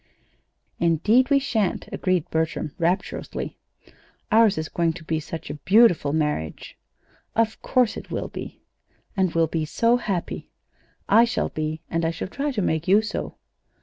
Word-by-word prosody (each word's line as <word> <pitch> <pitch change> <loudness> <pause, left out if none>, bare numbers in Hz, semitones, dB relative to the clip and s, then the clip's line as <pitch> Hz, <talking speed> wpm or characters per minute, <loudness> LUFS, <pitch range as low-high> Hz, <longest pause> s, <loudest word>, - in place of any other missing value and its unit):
"Indeed 210 - +3
we 280 - +5
sha'n't," 225 -9 -1
agreed 180 -3 0
Bertram, 160 -1 -1
rapturously. 175 +3 -2 0.7
"Ours 220 -4 +5
is 155 0 -2
going 170 0 0
to 170 - -10
be 160 0 -1
such 160 -1 -7
a 145 -1 -8
beautiful 190 -6 +5
marriage!" 150 - -2 0.6
"Of 225 -1 +1
course 250 -4 +2
it - - -9
will - - -3
be." - - -8 0.5
"And 190 -3 +2
we'll 165 0 +4
be 160 0 -2
so 230 +10 +2
happy!" 195 -7 -3 0.6
"I 225 +4 +6
shall 235 - -1
be, 155 0 -3
and 165 0 -1
I 165 - +2
shall 165 +2 -5
try 280 +7 -2
to 225 -8 -1
make 160 -1 -1
you 205 +4 +5
so." 215 - -4
175 Hz, 155 wpm, -24 LUFS, 160-220 Hz, 0.7 s, I